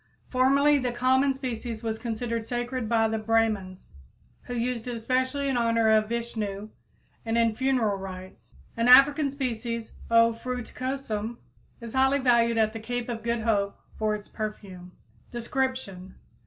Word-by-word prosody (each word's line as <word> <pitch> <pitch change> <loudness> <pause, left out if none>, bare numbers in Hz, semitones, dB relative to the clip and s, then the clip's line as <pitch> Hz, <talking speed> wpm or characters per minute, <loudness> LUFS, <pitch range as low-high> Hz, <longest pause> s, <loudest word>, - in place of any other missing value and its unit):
Formerly 280 +3 +4
the 250 -2 -1
common 260 +3 +2
species 240 -3 -5
was 220 -1 -2
considered 230 -1 -3
sacred 240 0 -3
by 225 -1 +3
the 220 0 -2
Brahmins 215 - -1 0.5
who 245 - -5
used 240 0 -2
it 245 - -3
especially 260 +4 -1
in 265 -2 0
honor 230 -1 +3
of 215 0 +3
Vishnu 215 -3 -4 0.5
and 225 0 -1
in 230 -1 +2
funeral 245 -5 +1
rites. 185 -1 -10 0.2
An 230 +1 +1
African 280 +3 +7
species, 235 -4 -4 0.2
O. 230 0 +5
fruticosum, 245 -1 -4 0.4
is 230 -1 -8
highly 265 +1 +3
valued 235 -3 +3
at 215 -1 +2
the 225 - -5
Cape 245 +2 -4
of 230 -2 -4
Good 235 0 -1
Hope 205 -3 0 0.2
for 215 -1 0
its 210 -1 -9
perfume. 190 -4 -7 0.4
_Description. 240 -6 -3
230 Hz, 145 wpm, -27 LUFS, 220-255 Hz, 0.5 s, African